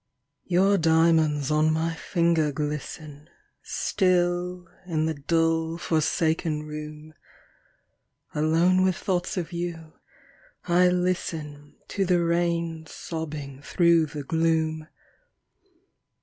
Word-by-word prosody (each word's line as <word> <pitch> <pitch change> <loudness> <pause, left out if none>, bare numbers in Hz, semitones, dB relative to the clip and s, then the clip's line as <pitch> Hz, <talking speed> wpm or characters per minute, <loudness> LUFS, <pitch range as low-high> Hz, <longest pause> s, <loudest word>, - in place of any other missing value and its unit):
Your 195 +2 +3
diamonds 160 -3 +3
on 155 +1 +3
my 160 +1 0
finger 165 -2 +1
glisten, 150 +1 -5 0.3
Still, 180 -1 0 0.2
in 155 -3 0
the 160 - 0
dull, 165 +2 0
forsaken 160 -1 0
room; 150 0 -8 1.2
Alone 165 +5 +3
with 185 -1 +2
thoughts 180 +2 -2
of 175 0 -3
you, 170 -2 -5 0.7
I 180 +1 +4
listen 160 -5 -3
To 200 - 0
the 175 -1 +2
rain 170 -1 -1
sobbing 150 -4 -6
through 170 0 +3
the 145 -1 -6
gloom. 160 0 0
165 Hz, 95 wpm, -26 LUFS, 155-175 Hz, 1.2 s, I